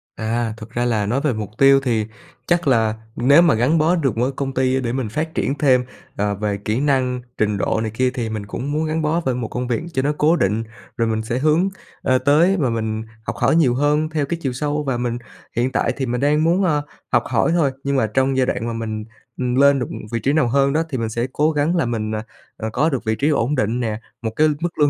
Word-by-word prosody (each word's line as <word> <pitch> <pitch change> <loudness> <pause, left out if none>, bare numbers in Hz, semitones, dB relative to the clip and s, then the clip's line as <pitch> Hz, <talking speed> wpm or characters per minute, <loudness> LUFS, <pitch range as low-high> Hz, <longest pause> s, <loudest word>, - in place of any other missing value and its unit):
À, 115 0 -1
thực 110 -1 -10
ra 120 +1 -1
là 110 -4 +1
nói 125 +7 0
về 150 -4 +1
mục 105 -2 -4
tiêu 135 0 +6
thì 115 -5 0 0.4
chắc 175 -3 +1
là 110 -4 +3 0.2
nếu 140 +7 +5
mà 170 -3 +5
gắn 130 +9 +2
bó 160 +3 +3
được 140 -9 0
với 125 +4 0
công 135 0 -4
ty 130 0 +1
để 120 -1 -2
mình 130 -5 -2
phát 160 +8 -3
triển 140 - 0
thêm, 130 -4 +3 0.3
ờ, 100 0 0
về 105 0 -2
kỹ 110 +4 -2
năng, 130 -3 +1 0.2
trình 105 -1 +1
độ 100 +3 0
này 110 -1 -2
kia 130 +3 +1
thì 120 -4 -3
mình 110 -2 -4
cũng 130 +7 -5
muốn 155 +2 0
gắn 155 +1 -1
bó 155 +3 +1
bởi 130 -2 +1
một 120 -3 -3
công 125 +2 -4
việc 120 +4 -1
cho 130 - +1
nó 145 +2 +1
cố 160 +3 +4
định. 105 - +1 0.3
Rồi 115 - +1
mình 110 0 0
sẽ 115 +3 -2
hướng, 155 +6 +3 0.3
ờ, 130 0 +3
tới 150 +9 +4
và 135 -5 +1
mình 110 -1 -2 0.2
học - - -4
hỏi - - +2
nhiều 135 -7 +3
hơn 150 +3 +1
theo 155 -2 -1
cái 170 +4 -3
chiều 135 -3 -2
sâu, 150 +3 -2
và 135 -4 -1
mình 120 -1 -2 0.4
hiện 120 +2 +1
tại - - 0
thì 135 - -1
mình 120 0 -2
đang 150 +2 +3
muốn, 175 +4 +3
ờ, 150 -5 +2 0.3
học 120 -2 +3
hỏi 130 +6 +1
thôi. 145 -6 +2
Nhưng 140 0 0
mà 115 -5 +2
trong 130 +4 +1
giai 130 - +3
đoạn 115 -2 -2
mà 115 - -2
mình, 110 -1 -4 0.3
ừm, 125 -1 -1
lên 140 0 +5
được, 125 - -2
ừm, - - -6
vị 115 - -1
trí 135 +4 +1
nào 150 -5 +3
hơn 140 +2 +2
đó 160 - +2
thì 130 - -2
mình 115 -1 -2
sẽ 115 +3 -2
cố 150 +2 +2
gắng 150 +3 +1
là 165 -7 +2
mình, 110 -2 -2
à, 110 - -3 0.3
ờ, 110 - -3
có 150 +6 +2
được 135 -7 -2
vị 110 - +1
trí 145 +7 +1
ổn 145 0 +1
định 120 0 0
nè, 110 -2 -2 0.2
một 110 -2 -2
cái 155 +1 +4
mức 170 -1 -4
lương 145 - +5
130 Hz, 265 wpm, -20 LUFS, 115-150 Hz, 0.4 s, tiêu